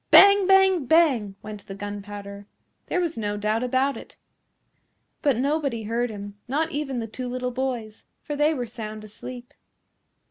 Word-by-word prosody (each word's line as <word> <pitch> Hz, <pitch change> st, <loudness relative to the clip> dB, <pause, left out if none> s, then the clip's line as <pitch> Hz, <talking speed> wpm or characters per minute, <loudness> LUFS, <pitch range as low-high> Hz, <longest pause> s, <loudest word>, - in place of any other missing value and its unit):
Bang! 400 Hz, -1 st, +8 dB
Bang! 385 Hz, -6 st, +5 dB
Bang! 265 Hz, -12 st, +4 dB
went 210 Hz, -1 st, -8 dB
the 195 Hz, -, -6 dB
gunpowder. 205 Hz, 0 st, -7 dB, 0.4 s
There -, -, 0 dB
was 335 Hz, -7 st, -1 dB
no 205 Hz, -1 st, -2 dB
doubt 215 Hz, +2 st, 0 dB
about 260 Hz, +2 st, +1 dB
it. -, -, -12 dB, 1.0 s
But 280 Hz, -6 st, +3 dB
nobody 275 Hz, -3 st, 0 dB
heard 235 Hz, +3 st, -1 dB
him, 205 Hz, -1 st, -8 dB
not 310 Hz, +5 st, 0 dB
even 280 Hz, -3 st, -2 dB
the 230 Hz, -, -2 dB
two 250 Hz, +3 st, -6 dB
little 250 Hz, 0 st, -2 dB
boys, 240 Hz, -4 st, -4 dB, 0.2 s
for 295 Hz, -, -4 dB
they 295 Hz, +2 st, +3 dB
were 250 Hz, -3 st, -2 dB
sound 215 Hz, -2 st, -7 dB
asleep. 245 Hz, +4 st, -9 dB
245 Hz, 155 wpm, -25 LUFS, 215-285 Hz, 1.0 s, Bang